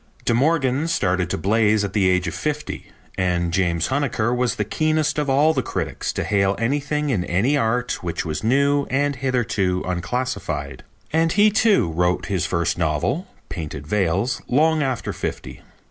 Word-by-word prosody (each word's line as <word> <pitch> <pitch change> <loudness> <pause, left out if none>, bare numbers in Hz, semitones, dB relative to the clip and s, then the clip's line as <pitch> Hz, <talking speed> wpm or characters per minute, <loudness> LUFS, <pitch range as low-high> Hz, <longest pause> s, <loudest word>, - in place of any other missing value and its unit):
De - - +2
Morgan 140 +2 +2
started 95 - 0
to - - -1
blaze 105 +3 +2
at 100 -1 -3
the 100 -3 +3
age 90 -1 +1
of 85 - -3
fifty, 150 0 -4 0.3
and 85 -2 0
James 85 -3 +1
Huneker 130 -4 0
was 125 -1 0
the 105 - -2
keenest 155 +6 0
of 145 -2 -1
all 145 +4 +4
the 135 - 0
critics - - -3
to - - -2
hail 100 -1 +1
anything 145 +4 -1
in 95 -8 0
any 110 +12 +1
art 125 -1 0
which 85 -1 -3
was 80 +3 -4
new 140 +4 +2
and 140 +1 0
hitherto 115 -8 0
unclassified. 90 - -3 0.3
And 165 0 +2
he, 210 +2 +5
too, 205 - +3
wrote 90 +2 0
his 95 -4 -1
first 85 0 -1
novel, 85 - 0 0.2
Painted 75 -4 -6
Veils, 100 - 0
long 155 +4 +3
after 130 -4 -2
fifty. - - -6
115 Hz, 165 wpm, -22 LUFS, 90-145 Hz, 0.3 s, he